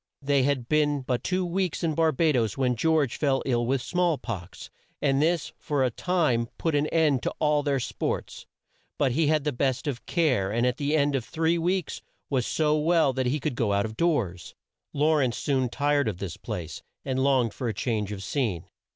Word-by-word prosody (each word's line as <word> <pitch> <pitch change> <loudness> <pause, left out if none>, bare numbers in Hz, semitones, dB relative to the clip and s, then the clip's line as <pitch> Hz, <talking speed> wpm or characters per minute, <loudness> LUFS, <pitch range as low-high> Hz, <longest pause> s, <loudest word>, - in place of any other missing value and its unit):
They 140 0 +3
had 130 -3 0
been 145 -1 +2
but 125 -1 -2
two 185 0 0
weeks 180 0 -2
in 160 -2 +1
Bar 160 +1 +3
ba 155 +2 +2
does 115 -4 0
when 125 -2 +1
George 155 0 +1
fell 135 -3 +1
ill 120 -3 +1
with 130 -1 0
small 175 -3 +1
pox, 95 -9 -7 0.3
and 140 -1 +2
this 165 +1 0
for 145 -3 0
a 125 - +1
time 150 -7 +1
put 165 - -1
an 145 +1 +2
end 155 -6 +2
to - - -3
all 150 -1 +2
their 140 -2 0
sports. - - -4 0.5
But 135 -3 +2
he 155 +4 +2
had 155 -1 +2
the 150 - 0
best 130 +1 -1
of 140 -5 -4
care, 130 - +1
and 120 +3 +1
at 125 -1 0
the 145 +1 0
end 145 -1 +2
of 130 - -1
three 165 +5 0
weeks 180 0 -1 0.3
was 130 -4 +1
so 155 -1 +1
well 160 -3 +3
that 130 -1 -1
he 145 +5 0
could 150 0 -2
go 115 -4 0
out 100 +1 +1
of 110 0 -6
doors. 115 - -1 0.4
Law 155 +2 +2
rence 130 -5 +1
soon 130 -3 0
tired 145 +1 +1
of 105 -5 -2
this 95 -3 -5
place, 90 -8 -6 0.2
and 130 -1 -1
longed 130 -5 +2
for 125 - -4
a 110 - -1
change 105 -4 -2
of 100 -2 -6
scene. 105 - -2
140 Hz, 210 wpm, -26 LUFS, 120-155 Hz, 0.5 s, They